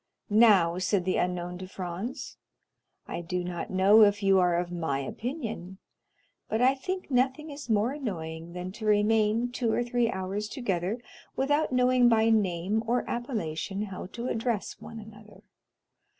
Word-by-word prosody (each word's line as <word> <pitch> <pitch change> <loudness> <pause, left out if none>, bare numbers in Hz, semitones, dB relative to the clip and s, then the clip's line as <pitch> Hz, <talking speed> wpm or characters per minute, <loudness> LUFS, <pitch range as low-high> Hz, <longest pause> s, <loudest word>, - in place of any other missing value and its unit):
"Now," 200 -6 +5
said 190 -1 +1
the 185 - +1
unknown 180 0 -2
to 185 - -7
Franz, 185 +6 -6 0.7
"I - - -4
do 180 +1 -3
not 175 -1 -5
know 195 +4 +5
if 205 -1 +4
you 195 -1 +5
are 175 -1 +3
of 175 0 -2
my 160 -5 -1
opinion, 215 - -5 0.7
but 220 - 0
I 255 +2 +5
think 365 +5 -5
nothing 265 +4 +1
is 285 -3 -9
more 220 +3 +2
annoying 170 - -5
than 180 +1 -5
to 215 +2 -6
remain 215 +3 +2
two 240 -2 -1
or 240 - +1
three 240 -1 +1
hours 195 +1 -3
together 200 -3 -2 0.4
without 290 +3 +1
knowing 250 -1 +4
by 225 0 +4
name 200 0 +1
or 245 +1 0
appellation 205 - -3
how 190 -3 -6
to 235 +5 -6
address 225 -3 -2
one 225 - -9
another. 210 -2 -13
210 Hz, 155 wpm, -28 LUFS, 180-240 Hz, 0.7 s, Now